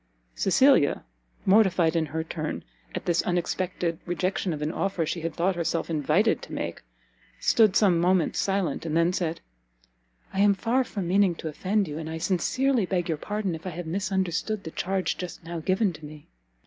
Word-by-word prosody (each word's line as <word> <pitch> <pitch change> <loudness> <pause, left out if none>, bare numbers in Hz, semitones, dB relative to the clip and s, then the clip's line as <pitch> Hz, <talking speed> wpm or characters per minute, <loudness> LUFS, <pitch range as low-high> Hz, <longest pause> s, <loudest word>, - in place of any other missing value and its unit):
Cecilia, 195 - +3 0.4
mortified 190 -5 +4
in 160 -1 +1
her 160 +2 -3
turn 155 -1 -4 0.3
at - - -4
this 170 -1 +2
unexpected 175 -1 -1
rejection 180 +1 -1
of 150 -2 -3
an 150 - -1
offer 190 -3 -1
she 170 +2 -3
had 165 -1 -3
thought 180 +2 +1
herself 170 0 -1
invited 160 +8 +2
to - - -10
make, - - -4 0.6
stood 215 -4 +4
some 185 -5 +4
moments 180 -1 +2
silent; 195 -7 0
and 160 -1 -1
then 170 +2 +3
said, 170 -2 -2 0.9
"I 190 - -2
am 200 0 +5
far 235 +7 +1
from 200 -7 -4
meaning 190 -1 +3
to 160 - -5
offend 195 +6 0
you, 150 +1 -5
and 160 -1 -5
I 160 - -4
sincerely 210 +7 +1
beg 175 -2 -1
your 160 - 0
pardon 205 -1 -2
if 165 +3 -7
I 175 - -5
have 175 - -4
misunderstood 190 +3 -1
the 160 - -7
charge 190 +2 -1
just 180 -1 -6
now 170 0 -5
given 185 +3 +1
to 155 0 -13
me." 150 0 -10
175 Hz, 185 wpm, -26 LUFS, 165-195 Hz, 0.9 s, am